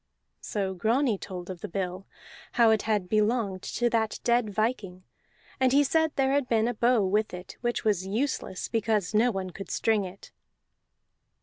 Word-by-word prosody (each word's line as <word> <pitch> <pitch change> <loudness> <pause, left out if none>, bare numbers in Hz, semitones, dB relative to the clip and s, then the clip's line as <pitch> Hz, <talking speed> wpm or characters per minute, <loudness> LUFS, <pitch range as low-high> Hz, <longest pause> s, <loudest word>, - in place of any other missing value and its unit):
So 195 -2 -3
Grani 225 +3 +1
told 180 -1 -7
of 175 -2 -9
the - - -4
bill, 185 +1 -4 0.5
how 230 -2 +5
it 220 - +3
had 205 -4 +1
belonged 215 -2 +1
to 240 - -1
that 220 -2 0
dead 240 -2 +2
viking; 205 -4 -2 0.6
and 260 -1 +3
he 285 +2 +5
said 320 +3 +2
there 270 -1 +2
had 275 -2 +1
been 225 -1 +2
a 245 - 0
bow 235 -2 +3
with 210 +1 0
it, 180 0 -10
which 240 0 -1
was 195 -3 +1
useless 220 -3 -2
because 220 -4 0
no 225 +4 +4
one 190 -4 -3
could 195 +1 -9
string 220 -2 +1
it. 190 +1 -10
215 Hz, 175 wpm, -27 LUFS, 190-240 Hz, 0.6 s, how